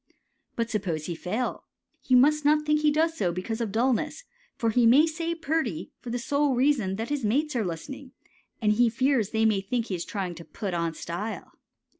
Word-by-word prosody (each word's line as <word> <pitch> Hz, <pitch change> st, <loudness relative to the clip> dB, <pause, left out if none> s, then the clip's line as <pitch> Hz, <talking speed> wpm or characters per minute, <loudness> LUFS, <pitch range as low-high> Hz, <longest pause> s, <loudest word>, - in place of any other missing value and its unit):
But 230 Hz, 0 st, -2 dB
suppose 175 Hz, -8 st, -2 dB
he 175 Hz, -, -3 dB
fail, 205 Hz, +9 st, -3 dB, 0.4 s
you 255 Hz, -, +5 dB
must 300 Hz, +4 st, +4 dB
not 300 Hz, +1 st, +3 dB
think 300 Hz, 0 st, +2 dB
he 305 Hz, -, +4 dB
does 320 Hz, +2 st, +1 dB
so 185 Hz, -, 0 dB
because 220 Hz, +6 st, -4 dB
of 225 Hz, -4 st, -2 dB
dullness, 245 Hz, -, 0 dB, 0.3 s
for 230 Hz, -5 st, 0 dB
he 235 Hz, +1 st, +4 dB
may 275 Hz, +7 st, +7 dB
say 330 Hz, +1 st, -3 dB
"purty" 315 Hz, -, -2 dB
for 245 Hz, -, -8 dB
the 240 Hz, -, -1 dB
sole 285 Hz, +1 st, +1 dB
reason 245 Hz, -7 st, +2 dB
that 225 Hz, +3 st, -4 dB
his 290 Hz, -3 st, -2 dB
mates 285 Hz, +7 st, +1 dB
are 235 Hz, -, +1 dB
listening 255 Hz, -, -6 dB, 0.5 s
and 210 Hz, -, +4 dB
he 235 Hz, +2 st, +4 dB
fears 245 Hz, -2 st, +1 dB
they 220 Hz, 0 st, +1 dB
may 210 Hz, -3 st, +3 dB
think 230 Hz, +4 st, -2 dB
he 190 Hz, -, -1 dB
is 170 Hz, -, -4 dB
trying 190 Hz, -5 st, -4 dB
to 170 Hz, 0 st, -10 dB
"put 195 Hz, +1 st, -5 dB
on 170 Hz, -1 st, -1 dB
style." 190 Hz, +9 st, -5 dB
235 Hz, 205 wpm, -27 LUFS, 200-285 Hz, 0.5 s, may